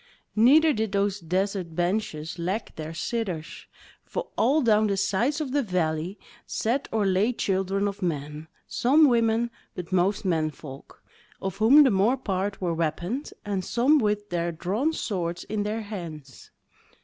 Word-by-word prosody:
Neither 295 +8 +6
did 220 -4 -2
those 200 0 +1
desert 185 0 -2
benches 175 -3 -2
lack 185 +6 -3
their 155 0 -6
sitters; 175 -2 -4 0.4
for 485 - -5
all 280 +6 +3
down 215 -2 +4
the 200 -1 0
sides 205 +10 +1
of 295 -4 -3
the 285 +1 +2
valley 180 - -1 0.3
sat 250 +6 -1
or 220 -2 +1
lay 195 +5 +2
children 195 -1 0
of 200 +1 -5
men; 150 -2 -3 0.2
some 295 +5 +4
women, 235 -1 +2 0.2
but 180 +1 -7
most 185 +3 +1
men 160 -4 +1
folk, 140 -3 -12 0.4
of 195 -1 -4
whom 250 +8 +7
the 265 - +4
more 210 +7 +3
part 195 -4 -2
were 175 -3 -1
weaponed, 175 - -2
and 200 -2 -2
some 270 +9 +3
with 210 -3 -1
their 170 0 -1
drawn 195 - -1
swords 175 - -3
in 210 0 -3
their 210 +2 -2
hands. 165 -10 -8
200 Hz, 155 wpm, -26 LUFS, 175-225 Hz, 0.4 s, whom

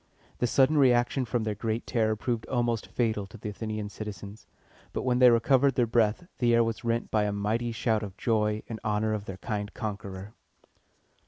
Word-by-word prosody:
The 125 - +2
sudden 140 +5 +4
reaction 125 0 +3
from 120 -1 -1
their 110 -1 -1
great 110 +2 -3
terror 110 -3 +1
proved 115 +1 -3
almost 120 -3 0
fatal 110 -4 -1
to 115 - -12
the 105 - -5
Athenian 110 0 -4
citizens. 105 0 -8 0.5
But - - -2
when 125 -1 +1
they 125 -1 +8
recovered 130 +3 +3
their 120 - +3
breath, 115 +6 +1
the 120 -2 +4
air 115 - +5
was 115 0 -3
rent 115 0 -1
by 105 -1 +2
a 105 - 0
mighty 110 +4 -1
shout 110 -1 0
of 100 -3 -7
joy 105 -1 0
in 110 -1 -6
honor 110 0 0
of 105 -1 -3
the 95 -2 -7
kind 105 0 -4
conqueror. 100 -2 -6
110 Hz, 190 wpm, -28 LUFS, 105-120 Hz, 0.5 s, they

